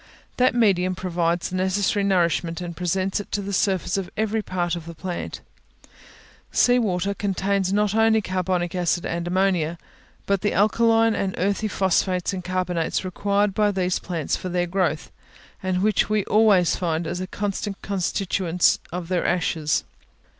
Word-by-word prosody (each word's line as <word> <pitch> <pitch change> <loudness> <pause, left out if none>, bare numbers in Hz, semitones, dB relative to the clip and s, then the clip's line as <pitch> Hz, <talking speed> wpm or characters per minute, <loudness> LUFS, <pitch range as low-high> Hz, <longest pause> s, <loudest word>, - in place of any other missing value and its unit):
That 255 0 +3
medium 185 -6 +2
provides 175 -1 -1
the - - -3
necessary 190 +2 +1
nourishment, 170 -4 +1
and 175 -1 -6
presents 185 +3 -1
it 205 - -8
to 205 - 0
the 200 +1 -4
surface 190 -1 +1
of 190 -2 -3
every 220 +1 0
part 175 -3 -2
of 165 -1 -8
the 170 - -8
plant. 175 +2 -5 1.1
Sea 245 0 +4
water 200 -3 0
contains 195 0 -1
not 210 0 +1
only 225 0 +4
carbonic 185 -3 -1
acid 175 -1 0
and 170 +1 -3
ammonia, 180 -3 +1 0.5
but 200 -1 +1
the 205 - 0
alkaline 225 +2 +3
and 195 -3 -2
earthy 200 +3 0
phosphates 190 -1 0
and 185 -1 -4
carbonates 180 -1 -1
required 200 +2 0
by 210 0 +2
these 185 -2 0
plants 170 -5 -2
for 185 - -5
their 175 0 0
growth, 175 -3 -1 0.5
and 185 0 -1
which 215 0 +2
we 215 -1 +1
always 205 -5 +4
find 165 -2 -1
as 180 +3 -3
constant 200 0 -3
constituents 185 -2 +1
of 175 0 -4
their 180 -1 0
ashes. 160 -3 0
185 Hz, 155 wpm, -23 LUFS, 175-200 Hz, 1.1 s, Sea